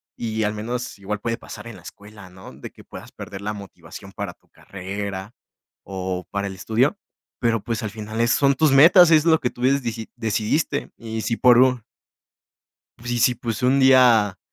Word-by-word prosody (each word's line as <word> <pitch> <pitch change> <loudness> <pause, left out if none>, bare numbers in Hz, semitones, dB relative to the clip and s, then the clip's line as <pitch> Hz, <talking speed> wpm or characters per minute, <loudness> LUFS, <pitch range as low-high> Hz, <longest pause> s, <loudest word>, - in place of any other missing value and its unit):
y 110 -1 -3
al 105 +1 -1
menos 120 +2 -5
igual 105 +1 -4
puede 115 +1 -3
pasar - - -11
en 115 - -9
la 90 - -14
escuela, 100 +1 -13
¿no?, 95 +1 -13
de - - -10
que - - -17
puedas - - -11
perder 95 0 -9
la 105 +1 -3
motivación 100 -1 -12
para - - -5
tu - - -37
carrera 100 +2 -7 0.5
o 95 -1 -5
para 100 0 -2
el 95 - -7
estudio, 125 - 0 0.4
pero, 115 -3 +1
pues, 115 0 -4
al 110 - -3
final, 110 +1 -5
eh, 120 - +2
son 140 +3 +3
tus 155 0 +3
metas, 165 +5 +7
es 155 -1 +5
lo 160 -1 +4
que 125 - 0
tú 120 - -14
des 135 0 +2
diji 115 -1 -5
decidiste, 115 +7 -1
y 110 -1 -6
si 115 +2 -1
por 125 -2 +5
un 125 -3 +3 1.2
Sí, 120 0 -2
sí, 125 +1 +3
pues, 115 -2 -5
un 130 +2 +3
día 120 -7 +4
115 Hz, 195 wpm, -22 LUFS, 105-125 Hz, 1.2 s, metas